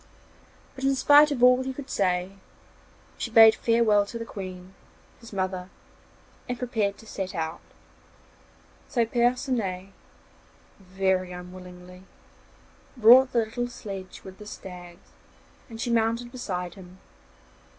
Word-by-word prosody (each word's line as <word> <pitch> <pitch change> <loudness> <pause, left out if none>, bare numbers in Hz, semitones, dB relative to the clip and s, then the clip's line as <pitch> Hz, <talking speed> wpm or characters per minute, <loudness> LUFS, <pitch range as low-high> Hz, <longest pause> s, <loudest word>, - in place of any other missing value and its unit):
But, 265 - -10
in 270 0 +2
spite 290 +3 +6
of 260 -4 -2
all 250 +1 +6
he 260 0 -5
could 280 -1 -8
say, 180 -1 0 0.9
she - - -3
bade 225 -1 +8
farewell 230 -3 +3
to 230 - -6
the 230 - -6
Queen, 185 -3 -9 0.5
his 230 - -13
mother, 185 -2 -3 0.8
and 245 - -2
prepared 220 -5 -2
to - - -15
set 190 -3 -5
out; 160 0 -3 1.3
so 235 -3 +1
Percinet, 235 -6 -1 0.9
very 190 -1 -1
unwillingly, 180 0 -11 1.0
brought 245 +3 +7
the 235 -2 +1
little 245 +2 -4
sledge 195 -6 -9
with 190 0 -12
the 210 - -11
stags 180 -3 -11 0.6
and 225 -1 -10
she 240 - -2
mounted 230 +1 0
beside 180 -8 -5
him. 185 -1 -14
210 Hz, 125 wpm, -26 LUFS, 185-240 Hz, 1.3 s, bade